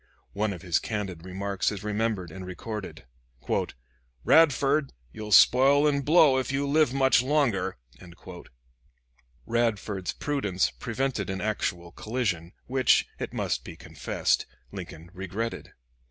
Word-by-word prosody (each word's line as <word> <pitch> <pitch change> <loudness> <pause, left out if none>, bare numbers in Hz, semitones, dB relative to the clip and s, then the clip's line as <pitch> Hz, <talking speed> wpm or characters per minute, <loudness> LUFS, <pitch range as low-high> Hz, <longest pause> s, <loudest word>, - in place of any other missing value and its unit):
One 105 +1 0
of 90 -4 -8
his 90 -3 +1
candid 95 -6 -4
remarks 95 +2 -2
is 105 -1 -6
remembered 105 -4 -2
and 95 +3 -8
recorded: 90 - -7 1.2
"Radford! 145 -2 +4 0.2
you'll 105 -1 -7
spoil 135 +7 +6
and 140 -1 +1
blow, 150 -3 +5
if 130 - -3
you 140 +1 -1
live 150 -2 +3
much 135 -2 +4
longer." 125 - 0 1.7
Radford's 110 -5 -1
prudence 105 -11 -1
prevented 120 -3 -3
an 95 0 -3
actual 90 -4 -2
collision, 100 -7 -3
which, 130 -1 +3
it - - -4
must - - -2
be - - -9
confessed, - - -1 0.2
Lincoln 85 -3 -9
regretted. 100 +4 -5
110 Hz, 120 wpm, -27 LUFS, 95-135 Hz, 1.7 s, spoil